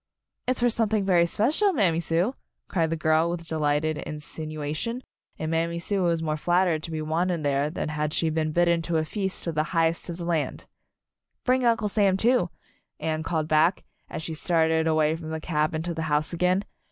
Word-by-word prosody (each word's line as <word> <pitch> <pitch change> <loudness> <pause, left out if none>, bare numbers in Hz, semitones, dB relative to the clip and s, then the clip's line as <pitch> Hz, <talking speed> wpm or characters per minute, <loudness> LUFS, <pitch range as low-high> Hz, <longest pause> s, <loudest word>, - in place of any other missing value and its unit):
"It's 255 -1 0
for 245 - +4
something 220 -3 +1
very 175 -3 +4
special, 305 - +2
Mam 200 - +3
my 165 - 0
Sue," 170 +8 +1 0.3
cried 165 -3 0
the 165 - 0
girl 160 +1 +2
with 170 -1 -4
delightful 150 -1 0
in 155 - -2
12 - - -7
Anne's 150 -1 -7
Wedding 155 -1 -5
sinuation, 155 - -3 0.4
and 155 0 -3
Mammy 165 +1 0
Sue 195 +3 0
was 170 -2 +1
more 155 -1 -1
flattered 175 0 +2
to 165 - -7
be 155 -1 -3
wanted 165 +1 0
there 140 +1 +1
than 155 - -3
had 150 0 -2
she 160 +1 +1
been 155 0 0
bidden 170 +1 +3
to 165 0 -1
a 155 - 0
feast 190 +2 -3
with 170 - -2
the 155 - +2 0.2
highest 165 +1 +1
of 170 - -4
the 170 - -5
land. 165 -4 -1 0.8
"Bring 255 0 +2
Uncle 230 -3 +2
Sam, 200 -2 +2
too," 235 -3 +3 0.5
Anne 155 -1 -1
called 160 -1 -1
back, 160 +4 +3 0.3
as 160 - -5
she 160 - -4
started 160 0 +2
away 155 0 +2
from 160 -1 -7
the 160 0 -3
cabin 155 0 -1
to 170 0 -3
the 160 - -4
house 150 +3 +1
again. 180 +3 +2
165 Hz, 215 wpm, -26 LUFS, 155-180 Hz, 0.8 s, for